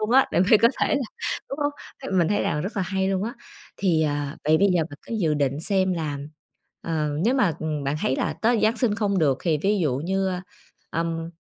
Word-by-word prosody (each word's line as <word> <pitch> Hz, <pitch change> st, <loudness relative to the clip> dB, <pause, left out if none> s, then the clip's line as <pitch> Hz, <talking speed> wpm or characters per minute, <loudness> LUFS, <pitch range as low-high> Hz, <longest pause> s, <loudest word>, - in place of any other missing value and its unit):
luôn 215 Hz, +1 st, -1 dB
á, 265 Hz, +2 st, +6 dB
để -, -, +3 dB
mà -, -, +5 dB, 0.2 s
có 230 Hz, -, +8 dB
thể -, -, +2 dB
là 280 Hz, -, +1 dB, 0.5 s
đúng 275 Hz, -, -5 dB
hông? 290 Hz, 0 st, +1 dB, 0.3 s
Th -, -, -6 dB
mình 170 Hz, -, +3 dB
thấy 205 Hz, -, +1 dB
là 150 Hz, -, 0 dB
rất 205 Hz, +6 st, -5 dB
là 195 Hz, -, +1 dB
hay 190 Hz, +1 st, -1 dB
luôn 190 Hz, 0 st, 0 dB
á. 235 Hz, +4 st, -4 dB, 0.4 s
Thì, 170 Hz, -5 st, +2 dB
à, 145 Hz, 0 st, -2 dB
vậy 155 Hz, +1 st, +4 dB
bây 200 Hz, 0 st, +4 dB
giờ 165 Hz, -, +3 dB
bạn 145 Hz, -, -10 dB
cứ 230 Hz, -, -4 dB
dự 160 Hz, -7 st, +1 dB
định 140 Hz, 0 st, 0 dB
xem 190 Hz, 0 st, +1 dB
là, 155 Hz, -4 st, -3 dB, 0.6 s
ờ, 155 Hz, -2 st, -1 dB, 0.2 s
nếu 250 Hz, +4 st, +3 dB
mà, 205 Hz, -11 st, +3 dB
ừm, 155 Hz, -3 st, -2 dB
bạn 140 Hz, +2 st, 0 dB
thấy 130 Hz, -, 0 dB
là -, -, -1 dB
tới 230 Hz, 0 st, +3 dB
Giáng 225 Hz, +2 st, +3 dB
sinh 225 Hz, -5 st, +1 dB
không 200 Hz, -3 st, 0 dB
được 140 Hz, -4 st, +2 dB
thì 160 Hz, -4 st, +1 dB
ví 205 Hz, +1 st, +2 dB
dụ 145 Hz, -7 st, +1 dB
như, 190 Hz, +1 st, 0 dB, 0.6 s
ừm, 165 Hz, 0 st, -2 dB
180 Hz, 240 wpm, -24 LUFS, 155-210 Hz, 0.6 s, có